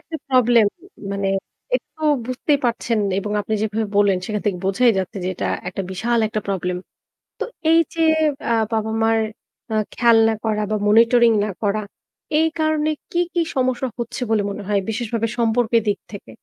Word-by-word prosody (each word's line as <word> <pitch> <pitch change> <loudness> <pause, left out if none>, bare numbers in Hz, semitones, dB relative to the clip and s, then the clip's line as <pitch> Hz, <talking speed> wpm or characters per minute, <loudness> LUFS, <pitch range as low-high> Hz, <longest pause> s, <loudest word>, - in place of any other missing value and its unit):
একটা 320 - -7
প্রবলেম। 240 -4 +5 0.5
মানে 200 0 -2 0.5
এটাতো 315 - -4 0.2
বুঝতেই 275 +3 0
পারছেন 235 -1 0 0.2
এবং 205 +1 -3
আপনি 220 - -2
যেভাবে 220 0 -1
বললেন 200 -2 +4
সেখান 210 -1 -2
থেকে 185 -3 0
বোঝাই 230 +5 +4
যাচ্ছে 190 +3 -4
যে, - - -1
এটা - - -3 0.2
একটা 195 +2 -4
বিশাল 235 +6 0
একটা 215 0 -2
প্রবলেম। 180 -2 -1 0.6
তো - - 0 0.3
এই 330 - +6
যে 330 - -2 0.5
আ - - +4 0.2
বাবা-মার 225 +1 +1 0.6
আ - - +1 0.2
খেয়াল 235 -2 +4
না 225 - +2
করা 215 -1 0
বা - - +2
মনিটরিং 230 +2 +5
না 210 - -3
করা, 215 0 0 0.6
এই 320 - +4
কারণে 310 -1 +1 0.2
কি, 345 - 0
কি 345 - +2
সমস্যা 255 0 0
হচ্ছে 235 +2 -4
বলে 220 -2 +2
মনে 200 - -5
হয় 205 -1 +2
বিশেষভাবে 230 0 -1
সম্পর্কের 230 0 +2
দিক 205 -1 +1
থেকে? 195 - -10
225 Hz, 170 wpm, -21 LUFS, 205-245 Hz, 0.6 s, এই